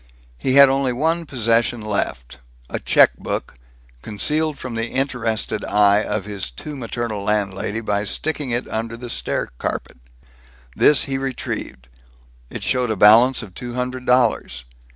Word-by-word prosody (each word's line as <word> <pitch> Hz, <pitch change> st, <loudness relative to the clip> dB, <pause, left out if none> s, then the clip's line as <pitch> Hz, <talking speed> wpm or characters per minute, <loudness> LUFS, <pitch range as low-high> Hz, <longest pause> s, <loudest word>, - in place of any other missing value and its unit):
He 130 Hz, -, 0 dB
had 140 Hz, 0 st, +9 dB
only 135 Hz, -1 st, +1 dB
one 160 Hz, +5 st, -1 dB
possession 115 Hz, -1 st, +1 dB
left 100 Hz, -, -3 dB, 0.3 s
a -, -, -2 dB
check -, -, +5 dB
book, -, -, -4 dB, 0.5 s
concealed 150 Hz, -, -1 dB
from 130 Hz, -2 st, -7 dB
the 115 Hz, +1 st, -3 dB
interested 115 Hz, -6 st, -2 dB
eye 105 Hz, +1 st, +3 dB
of -, -, -3 dB
his 100 Hz, -9 st, -5 dB
too 145 Hz, -, -8 dB
maternal 115 Hz, -4 st, -4 dB
landlady 105 Hz, +1 st, -1 dB
by 105 Hz, -2 st, -1 dB
sticking 150 Hz, +5 st, -3 dB
it 120 Hz, +1 st, -2 dB
under 115 Hz, +1 st, -4 dB
the 120 Hz, 0 st, -6 dB
stair -, -, -2 dB
carpet. -, -, -4 dB, 0.8 s
This 150 Hz, -2 st, +5 dB
he 135 Hz, -1 st, -2 dB
retrieved. 115 Hz, -, -5 dB, 0.6 s
It -, -, -7 dB
showed 125 Hz, -2 st, 0 dB
a 110 Hz, -, 0 dB
balance 115 Hz, +6 st, +6 dB
of 95 Hz, -5 st, -11 dB
two 120 Hz, +4 st, -7 dB
hundred 125 Hz, 0 st, -4 dB
dollars. 115 Hz, -, +1 dB
115 Hz, 150 wpm, -21 LUFS, 105-130 Hz, 0.8 s, had